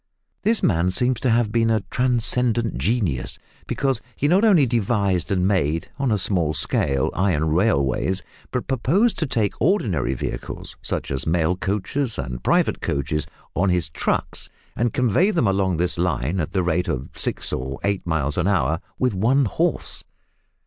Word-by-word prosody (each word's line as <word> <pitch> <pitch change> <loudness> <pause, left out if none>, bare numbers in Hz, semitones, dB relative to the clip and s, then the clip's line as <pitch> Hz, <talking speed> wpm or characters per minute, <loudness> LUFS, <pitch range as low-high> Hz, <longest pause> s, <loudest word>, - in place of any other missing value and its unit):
This 225 +1 +1
man 85 +1 +2
seems 125 +6 +1
to 130 - 0
have 115 -2 +2
been 115 0 +2
a 110 -3 +1
transcendent 120 -2 +2
genius, 85 - -1 0.3
because 135 -4 0
he 145 - 0
not 185 +7 +3
only 190 -10 +5
devised 100 -6 0
and 90 -1 +2
made 80 -5 0
(on 135 -2 +1
a 105 - +2
small 85 -6 0
scale) 70 -2 +1
iron 85 -5 +1
railways, 90 - +1 0.3
but 125 - -3
proposed 175 - +1
to 160 - 0
take 110 -5 0
ordinary 110 - +1
vehicles, - - -6
such - - -2
as 65 +1 -2
mail 85 +1 +2
coaches 105 +7 -1
and 60 -2 -4
private - - +2
carriages, 70 +1 -2 0.3
on 95 +2 +2
his 90 -4 0
trucks, - - -2 0.3
and 120 0 0
convey 125 - +2
them 175 - +1
along 95 -3 +1
his 85 0 -1
line 90 -1 0
at 80 - -2
the 95 -2 +1
rate 90 +1 0
of 65 +1 -3
six - - 0
or 65 +1 -3
eight 100 -1 0
miles 75 -2 0
an 90 - +1
hour 80 -5 +1 0.2
with 125 -3 +1
one 125 +8 +2
horse. 100 - -2
95 Hz, 165 wpm, -22 LUFS, 80-120 Hz, 0.3 s, only